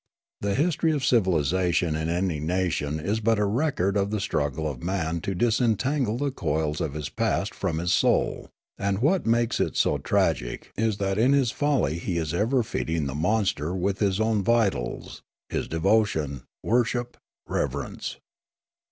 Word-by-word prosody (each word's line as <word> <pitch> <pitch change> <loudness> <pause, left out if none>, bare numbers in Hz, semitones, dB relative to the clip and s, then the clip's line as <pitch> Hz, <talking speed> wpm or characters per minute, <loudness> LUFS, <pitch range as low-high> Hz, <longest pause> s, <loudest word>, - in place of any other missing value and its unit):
The 100 -1 -1
history 160 +2 +2
of 145 -4 -1
civilisation 90 - +2
in 80 +1 -2
any 85 -2 0
nation 80 -2 -1
is 100 +8 -1
but 110 0 +2
a 105 - +2
record 105 - 0
of 100 0 +1
the 105 0 -1
struggle 75 -4 -1
of 65 -5 -5
man 85 -3 -2
to 95 - -3
disentangle 120 +3 +1
the 140 +1 -1
coils 75 - -1
of 75 -2 -2
his 75 -2 -3
past - - -1
from 80 - -2
his 85 +2 0
soul; - - +1 0.3
and 100 0 0
what 150 - +1
makes 120 +1 +2
it - - 0
so - - +2
tragic - - 0
is 110 -1 0
that 95 0 -1
in 125 +5 +4
his 135 -5 +3
folly 135 - 0
he 85 0 -2
is 80 -2 -2
ever 115 +7 +2
feeding 80 -7 -2
the 70 - -3
monster 90 -1 0
with 95 +2 -1
his 100 -2 +1
own 110 -1 +2
vitals, 100 - 0 0.3
his - - -2
devotion, 80 - +1 0.2
worship, 120 +1 0 0.3
reverence. - - -3
100 Hz, 160 wpm, -26 LUFS, 80-115 Hz, 0.3 s, in